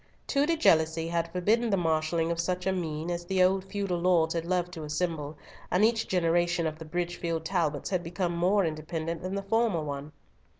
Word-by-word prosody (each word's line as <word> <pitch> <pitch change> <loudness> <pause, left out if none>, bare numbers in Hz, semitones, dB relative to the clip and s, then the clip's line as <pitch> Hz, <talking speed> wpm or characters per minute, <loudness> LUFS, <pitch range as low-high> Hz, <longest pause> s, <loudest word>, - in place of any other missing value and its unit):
Tudor 295 +4 +2
jealousy 160 - +3
had 170 0 -1
forbidden 220 +7 +2
the 195 - +2
marshalling 165 0 +1
of 170 - -2
such 180 +1 -1
a 190 - +2
meine 165 -2 -3
as 175 0 -3
the 185 +1 +2
old 190 +1 +3
feudal 195 -2 -2
lords 170 -2 +3
had 165 -1 -2
loved 180 0 0
to 160 - -6
assemble, 150 -1 -3 0.3
and 190 +4 +4
each 225 0 +1
generation 175 -1 +1
of 155 0 -3
the 160 - -8
Bridgefield 170 0 -3
Talbots 165 -3 -1
had 185 -2 +1
become 175 0 -2
more 185 +3 +3
independent 160 +1 -3
than 185 +2 -3
the 200 - -3
former 215 -5 +1
one. 145 0 -5
170 Hz, 195 wpm, -28 LUFS, 160-185 Hz, 0.3 s, and